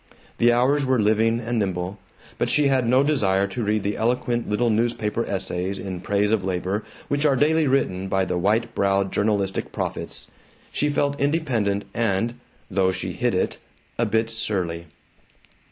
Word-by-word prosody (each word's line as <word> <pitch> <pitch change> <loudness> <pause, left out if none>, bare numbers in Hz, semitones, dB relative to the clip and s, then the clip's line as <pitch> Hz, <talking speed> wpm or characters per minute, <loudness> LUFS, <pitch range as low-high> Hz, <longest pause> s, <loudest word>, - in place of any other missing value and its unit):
The 120 +1 +5
hours 130 +4 +3
were 130 -1 +2
living 110 +2 +2
and 120 0 -2
nimble. 95 0 -2 0.4
But - - +1
she 145 -2 +3
had 130 -3 +2
no 130 +2 +5
desire 100 -10 +2
to 105 +5 -4
read 105 0 0
the 100 0 -1
eloquent 120 +1 0
little 115 +3 +2
newspaper 115 0 0
essays 95 0 -2
in 95 -2 -5
praise 105 +1 +1
of 110 -4 +1
labor 95 +3 -2 0.2
which 145 +1 0
are 145 -3 +4
daily 155 +3 +3
written 95 -9 0
by 95 -1 +1
the 90 - -2
white 110 +6 +1
browed 100 -1 +1
journalistic 100 -2 0
prophets. - - -4 0.5
She 150 - 0
felt 145 -1 0
independent 125 -10 0
and 115 0 0 0.4
(though 95 0 +2
she - - -4
hid - - 0
it) - - -1 0.4
a 115 - +2
bit 110 +2 0
surly. 90 -7 -2
110 Hz, 165 wpm, -23 LUFS, 95-120 Hz, 0.5 s, The